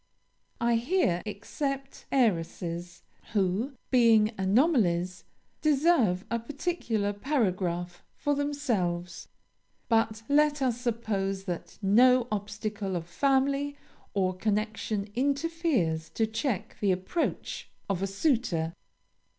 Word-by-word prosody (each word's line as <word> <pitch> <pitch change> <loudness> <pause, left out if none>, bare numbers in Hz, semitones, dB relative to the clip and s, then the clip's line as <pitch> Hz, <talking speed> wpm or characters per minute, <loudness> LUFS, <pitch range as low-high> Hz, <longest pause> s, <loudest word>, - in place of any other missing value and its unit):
I 235 0 +3
here 235 - +1
except 275 +6 -4
heiresses, 175 -6 0 0.3
who, 205 +6 +1 0.2
being 230 -3 +5
anomalies, 190 - +2 0.4
deserve 275 - +3
a 235 - +1
particular 235 - -2
paragraph 185 - -1
for 290 - 0
themselves. 230 -13 -1 0.6
But 225 -1 +2
let 295 +1 +3
us 245 -3 0
suppose 200 -5 -1
that 175 -3 -5
no 245 +5 +5
obstacle 210 -1 -3
of 170 -2 -3
family 275 +6 +1 0.4
or 185 -2 +1
connection 215 0 -1
interferes 275 - 0
to 225 - +2
check 220 - -3
the 200 -2 +2
approach 185 - -2 0.2
of 195 -2 -1
a 195 - 0
suitor. 195 - 0
220 Hz, 100 wpm, -29 LUFS, 190-275 Hz, 0.6 s, being